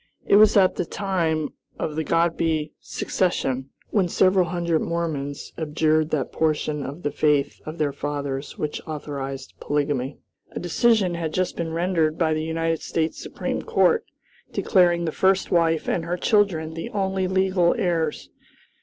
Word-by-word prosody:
It 200 - +5
was 215 0 +6
at 190 -2 +4
the - - +1
time 165 -6 -1 0.3
of 155 - -3
the 160 - -1
Godby 165 -1 +1
secession, 135 -8 -1 0.2
when 195 -4 +2
several 185 +1 +4
hundred 170 -1 0
Mormons 155 -4 -3
abjured 155 0 +1
that 145 -5 -1
portion 155 -2 0
of 145 +6 -7
the 145 - 0
faith 150 -2 +1
of 155 +2 -6
their 150 -3 0
fathers 140 -1 -4
which 150 -1 -3
authorized 140 -3 -5
polygamy. 145 -2 -1 0.4
A - - -4
decision 185 +2 +2
had 165 -2 -3
just 185 0 0
been 165 -1 -3
rendered 165 -2 +1
by 160 -2 +2
the 155 - -1
United 165 0 -1
States 160 -1 -2
Supreme - - -3
Court 460 -1 +3 0.5
declaring 175 -3 +3
the 160 - -1
first 190 +3 +2
wife 165 -2 +2
and 170 - 0
her 175 +2 -2
children 175 -6 +2
the 165 0 -5
only 190 -2 -1
legal 185 -2 +2
heirs. 170 -7 -1
165 Hz, 155 wpm, -24 LUFS, 150-180 Hz, 0.5 s, was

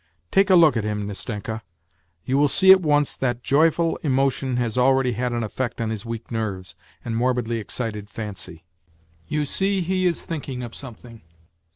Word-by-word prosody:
Take 195 +1 +3
a 185 - +6
look 160 -6 +6
at 110 - 0
him, 105 -1 -2
Nastenka; 105 +2 -5 0.6
you 130 - 0
will 145 +1 +4
see 190 +6 +6
at 190 0 +7
once 145 -3 +2
that 120 -2 -2
joyful 165 +3 +2
emotion 135 -2 0
has 120 -3 -1
already 130 0 +3
had 120 +2 -2
an 120 -1 -1
effect 120 +3 -4
on 115 -1 -1
his 110 +1 -6
weak 115 +1 -6
nerves 95 -6 -4 0.3
and 115 -1 -3
morbidly 120 -1 0
excited 105 -1 -5
fancy. 95 -6 -8 0.6
You 150 - -1
see 195 +6 0
he 185 +1 0
is 170 - -2
thinking 135 -6 -5
of 120 -2 -7
something. 120 -3 -10
125 Hz, 175 wpm, -23 LUFS, 110-145 Hz, 0.6 s, at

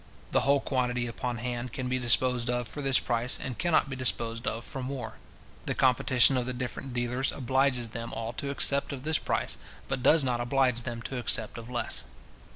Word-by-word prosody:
The - - +3
whole 140 0 +3
quantity 125 -2 -1
upon 120 +1 -4
hand 120 0 -4
can 130 - -3
be 130 0 -1
disposed 120 0 +2
of 125 -1 -1
for 145 - -6
this 135 -2 +5
price, 120 +1 0
and 130 -2 -6
can 175 -1 +1
not 155 - +3
be 135 - -5
disposed 115 -2 -1
of 115 +1 -3
for 135 - -6
more. 130 0 -6 0.5
The - - 0
competition 130 0 +4
of 125 -1 -2
the 125 - -3
different 130 +1 -5
dealers 125 +2 0
obliges 130 -2 0
them 115 +1 -6
all 115 +1 -5
to 140 - -4
accept 140 0 +3
of 130 -2 -7
this 155 +1 +2
price, - - -2 0.3
but 135 -1 -2
does 155 +4 +5
not 125 -2 -1
oblige 125 -1 +1
them 120 -1 -6
to 130 0 -4
accept 110 -1 +1
of 115 +1 -10
less. 120 -1 +1
125 Hz, 205 wpm, -28 LUFS, 120-135 Hz, 0.5 s, this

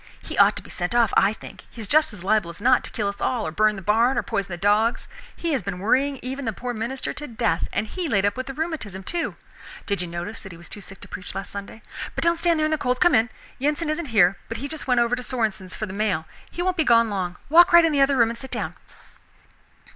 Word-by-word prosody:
He - - -6
ought - - +5
to - - -7
be - - -13
sent 175 +6 -3
off, 235 -4 +3
I 195 +1 +5
think. 220 - -11
He - - -14
is 215 - -6
just 310 +2 +3
as 200 -4 -10
liable 205 -2 +2
as 170 - -10
not 255 +4 +4
to - - -7
kill 210 -3 -2
us 200 0 -5
all, 245 -4 0
or 155 - -3
burn 215 +5 +2
the 195 - -8
barn, 230 +6 +3
or - - +1
poison 195 - -2
the 175 - -5
dogs. 210 +5 +2 0.3
He 335 -2 -2
has 265 - 0
been 195 -2 -4
worrying 265 +8 +1
even 265 +2 -4
the 225 - -1
poor 245 +4 -4
minister 235 +4 -4
to 295 - -6
death, 225 -8 0
and 205 - -1
he 345 - -4
laid 200 -5 +2
up 205 - +1
with 255 0 -5
the 270 - -5
rheumatism, 295 - -4
too! 340 - -2 0.5
Did 200 -3 -1
you 180 - -3
notice 175 +6 -6
that 195 - -10
he 170 - -11
was 170 - -13
too 205 - -7
sick 195 0 -10
to - - -11
preach 185 - -7
last 195 - -5
Sunday? 200 +2 -8 0.3
But - - -2
don't 335 0 +3
stand 335 -2 +2
there 310 - +2
in 310 - 0
the 310 - 0
cold, 250 -1 0
come 350 - +5
in. 230 0 +4 0.3
Yensen 300 +3 0
isn't 310 0 -3
here, 195 -6 +4
but 225 - -4
he 280 - -4
just 310 0 -5
went 250 -2 +3
over 235 +1 +2
to 250 - -6
Sorenson's 215 -7 -2
for 215 - -3
the 190 - -8
mail; 195 -6 0 0.2
he 350 - -4
won't 370 0 0
be 320 - +3
gone 230 -4 +4
long. 180 -3 -2
Walk 340 +4 +7
right 345 -1 +8
in 325 - +2
the 285 -2 +2
other 275 0 +4
room 230 -1 +4
and 235 - -8
sit 265 - -8
down." - - -3
230 Hz, 280 wpm, -24 LUFS, 200-275 Hz, 0.5 s, right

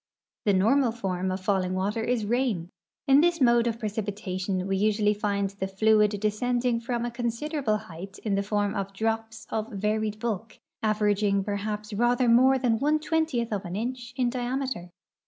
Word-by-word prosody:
The 205 - +4
normal 230 +7 +3
form 190 -5 -2
of 185 +1 -3
falling 185 -2 0
water 205 +4 -1
is 235 -2 0
rain. 215 -7 0 0.4
In 275 +1 +7
this 340 0 +2
mode 240 -2 +4
of 230 -1 -1
precipitation 200 -4 -3
we 195 - 0
usually 210 +1 +2
find 200 -1 -1
the 195 -1 -4
fluid 210 +2 +4
descending 240 +3 0
from 235 0 -2
a 240 - -3
con 240 0 -2
sideral)le 235 -3 -1
height 190 0 -10
in 210 - 0
the 200 - +2
form 205 0 0
of 195 -2 -3
drops 225 +1 -2
of 220 0 -2
varied 210 +1 -1
bulk, 220 -1 -4 0.2
averaging 210 -2 +2
perha[)s 210 +1 -3
rather 245 +1 +3
more 260 +3 +6
than 240 -4 +1
one 300 +2 +3
twentieth 310 -7 0
of 200 -1 -2
an 175 -1 -5
inch 245 +2 -4
in 250 -2 +1
diameter. 250 -6 -3
215 Hz, 175 wpm, -27 LUFS, 200-240 Hz, 0.4 s, In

